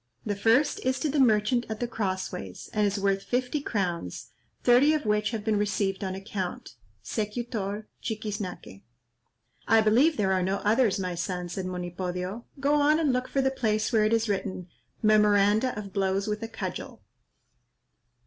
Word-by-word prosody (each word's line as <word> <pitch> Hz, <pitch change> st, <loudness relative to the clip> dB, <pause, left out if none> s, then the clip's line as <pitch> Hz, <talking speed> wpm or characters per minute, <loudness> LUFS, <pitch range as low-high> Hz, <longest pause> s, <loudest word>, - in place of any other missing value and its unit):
"The 205 Hz, -2 st, -1 dB
first 230 Hz, +8 st, +3 dB
is 260 Hz, +1 st, 0 dB
to 310 Hz, -, +1 dB
the 290 Hz, +1 st, 0 dB
merchant 235 Hz, 0 st, +3 dB
at 220 Hz, -1 st, -4 dB
the 240 Hz, -, -1 dB
Cross 190 Hz, -5 st, -2 dB
ways, 90 Hz, -1 st, -8 dB
and 210 Hz, -1 st, +2 dB
is 200 Hz, +1 st, -1 dB
worth 195 Hz, 0 st, +1 dB
fifty 250 Hz, +6 st, -1 dB
crowns, 170 Hz, -, -3 dB, 0.3 s
thirty 255 Hz, +5 st, +5 dB
of 300 Hz, -, -3 dB
which 210 Hz, 0 st, +1 dB
have 220 Hz, -2 st, -4 dB
been 215 Hz, -2 st, +2 dB
received 200 Hz, -1 st, -1 dB
on 190 Hz, -1 st, -3 dB
account. 195 Hz, -, -5 dB, 0.3 s
Secutor, 215 Hz, -1 st, -3 dB
Chiquiznaque. 210 Hz, -, -5 dB, 0.9 s
"I 225 Hz, 0 st, +6 dB
believe 255 Hz, +9 st, +4 dB
there 190 Hz, -2 st, +2 dB
are 185 Hz, -, +1 dB
no 190 Hz, +2 st, 0 dB
others, 220 Hz, -1 st, +3 dB
my 185 Hz, -2 st, -2 dB
son," 180 Hz, +1 st, -3 dB
said 185 Hz, +1 st, -4 dB
Monipodio; 180 Hz, +3 st, -4 dB
"go 280 Hz, +1 st, +2 dB
on 300 Hz, +2 st, +4 dB
and 295 Hz, -5 st, +2 dB
look 250 Hz, 0 st, -1 dB
for 275 Hz, -, 0 dB
the 265 Hz, -, +2 dB
place 215 Hz, -3 st, 0 dB
where 220 Hz, -2 st, +4 dB
it 215 Hz, -, +1 dB
is 230 Hz, 0 st, +2 dB
written, 190 Hz, -3 st, -3 dB, 0.3 s
'Memoranda 210 Hz, +2 st, +4 dB
of 200 Hz, -2 st, -7 dB
blows 195 Hz, 0 st, 0 dB
with 210 Hz, 0 st, -2 dB
a 225 Hz, -, -3 dB
cudgel.'" -, -, -6 dB
210 Hz, 170 wpm, -27 LUFS, 195-235 Hz, 0.9 s, I